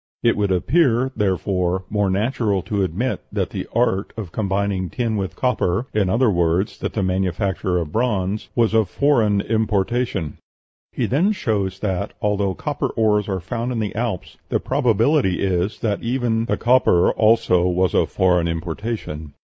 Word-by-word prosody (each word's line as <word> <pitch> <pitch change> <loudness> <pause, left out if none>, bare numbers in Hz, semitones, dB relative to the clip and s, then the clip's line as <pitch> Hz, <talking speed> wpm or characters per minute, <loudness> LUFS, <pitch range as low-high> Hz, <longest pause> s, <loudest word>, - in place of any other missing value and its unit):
It 115 - +4
would 100 -2 0
appear, 130 - +2
therefore, 95 -2 0
more 105 -1 0
natural 105 -1 0
to 105 -2 -1
admit 95 +8 -1
that - - -2
the - - -5
art 95 +2 0
of 100 -7 -6
combining 100 -2 -1
tin 115 +1 -2
with 95 -3 -3
copper 120 -5 0
in 100 -3 +1
other 115 +3 +3
words, 85 +2 0
that - - -3
the 105 - -1
manufacture 95 0 -1
of 80 -4 -3
bronze 105 -3 -1
was 115 -2 +2
of 110 -4 +3
foreign 110 -8 +2
importation." 110 - -1 0.5
He - - -1
then 175 - +2
shows 100 - -2
that, 100 -1 -2
although 100 -2 0
copper - - -2
ores 105 -2 +1
are 95 -1 -1
found 115 +8 -3
in 120 - -2
the 105 -2 -2
Alps, 110 -3 -4
the - - +1
probability 125 - +2
is 95 +1 -1
that 105 -3 -1
even 115 -2 0
"the - - -1
copper 120 -8 +4
also 110 -5 +3
was 90 0 +1
of - - +2
foreign 90 -2 +2
importation. 80 -2 -5
105 Hz, 160 wpm, -21 LUFS, 95-115 Hz, 0.5 s, It